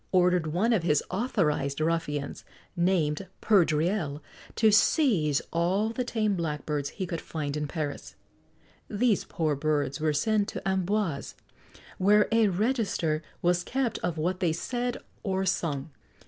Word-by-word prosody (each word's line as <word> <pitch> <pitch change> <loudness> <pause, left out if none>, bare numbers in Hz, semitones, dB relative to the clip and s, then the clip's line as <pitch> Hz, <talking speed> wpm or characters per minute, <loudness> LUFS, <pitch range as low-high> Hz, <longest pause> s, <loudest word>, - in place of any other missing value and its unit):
ordered 180 -3 +3
one 190 +10 +1
of 210 - +2
his 150 -3 +2
authorised 165 - 0
ruffians, 155 -3 -2 0.3
named 175 -1 +1
Perdriel, 165 -4 +2 0.4
to 220 -1 +4
seize 200 - +3
all 185 +6 +1
the 250 +2 -2
tame 220 -4 0
blackbirds 150 -3 -2
he 190 - -4
could 170 -2 -4
find 150 -3 -4
in 150 -1 -2
Paris. 150 -2 -5 0.7
These 215 0 +1
poor 155 -3 -1
birds 145 -2 -1
were 155 -1 +2
sent 205 +8 +1
to - - -5
Amboise, 190 -4 -1 0.6
where 205 +2 +5
a 225 -1 +4
register 200 -6 0 0.2
was 175 0 +2
kept 260 +1 -1
of 175 -2 -2
what 175 +4 -1
they 170 -4 +1
said 245 +7 -2 0.2
or 190 -2 -1
sung. 155 -5 -1
175 Hz, 135 wpm, -28 LUFS, 155-210 Hz, 0.7 s, where